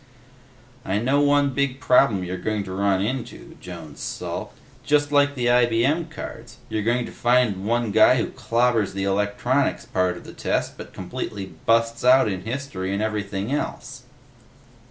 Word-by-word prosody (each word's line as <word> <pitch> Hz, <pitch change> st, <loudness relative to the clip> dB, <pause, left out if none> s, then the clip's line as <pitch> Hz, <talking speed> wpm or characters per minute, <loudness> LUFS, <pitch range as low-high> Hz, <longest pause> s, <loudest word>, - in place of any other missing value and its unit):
"I 95 Hz, -, -1 dB
know 130 Hz, +6 st, +2 dB
one 145 Hz, -1 st, +3 dB
big 140 Hz, 0 st, -1 dB
problem 125 Hz, -8 st, +3 dB
you're 90 Hz, 0 st, -4 dB
going 105 Hz, +2 st, -2 dB
to 95 Hz, -, -8 dB
run 100 Hz, 0 st, +1 dB
into," 125 Hz, +4 st, -5 dB
Jones 85 Hz, -5 st, -9 dB
sulked. -, -, -5 dB, 0.3 s
"Just 145 Hz, 0 st, +2 dB
like 145 Hz, 0 st, +3 dB
the 125 Hz, -2 st, -2 dB
IBM 125 Hz, +7 st, +2 dB
cards. 160 Hz, -, -9 dB
You're 110 Hz, -, -1 dB
going 120 Hz, +3 st, +1 dB
to -, -, -9 dB
find 120 Hz, -6 st, +1 dB
one 120 Hz, -1 st, 0 dB
guy 110 Hz, +4 st, +6 dB
who 120 Hz, -, -1 dB
clobbers 115 Hz, -3 st, +1 dB
the 95 Hz, 0 st, -3 dB
Electronics 105 Hz, +7 st, 0 dB
part 90 Hz, -1 st, 0 dB
of -, -, -11 dB
the -, -, -11 dB
test -, -, -2 dB
but -, -, -10 dB
completely 100 Hz, -2 st, -6 dB
busts 115 Hz, 0 st, +2 dB
out 130 Hz, 0 st, +6 dB
in 95 Hz, -2 st, -4 dB
History 115 Hz, -7 st, -4 dB
and 100 Hz, +2 st, -1 dB
everything 105 Hz, 0 st, -3 dB
else." 145 Hz, -, -4 dB
115 Hz, 160 wpm, -23 LUFS, 100-130 Hz, 0.3 s, guy